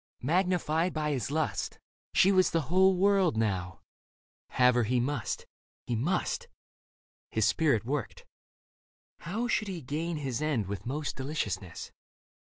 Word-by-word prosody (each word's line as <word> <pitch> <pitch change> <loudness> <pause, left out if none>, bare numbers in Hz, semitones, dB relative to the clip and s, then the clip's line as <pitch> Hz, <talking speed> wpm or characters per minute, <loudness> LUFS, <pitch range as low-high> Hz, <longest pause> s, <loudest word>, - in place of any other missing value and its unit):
Magnified 175 +1 +1
by 150 -1 0
his 135 -3 -2
lust. 155 +1 -1 0.3
She 195 - +5
was 185 -1 +4
the 165 - +1
whole 190 0 +5
world 190 - +3
now; 95 -5 -1 0.7
have 125 0 +4
her 120 - +3
he 125 +3 +1
must, 125 -1 -2 0.4
he 120 - -1
must... 180 - -1 0.8
His - - +1
spirit 140 - +2
worked; 135 -1 -3 0.9
how 220 +8 -3
should 215 -3 0
he 185 -3 -4
gain 155 +4 -3
his 135 -3 -3
end 145 -9 0
With 100 +4 -5
most 145 +3 -3
deliciousness 105 - -4
150 Hz, 135 wpm, -30 LUFS, 120-180 Hz, 0.9 s, She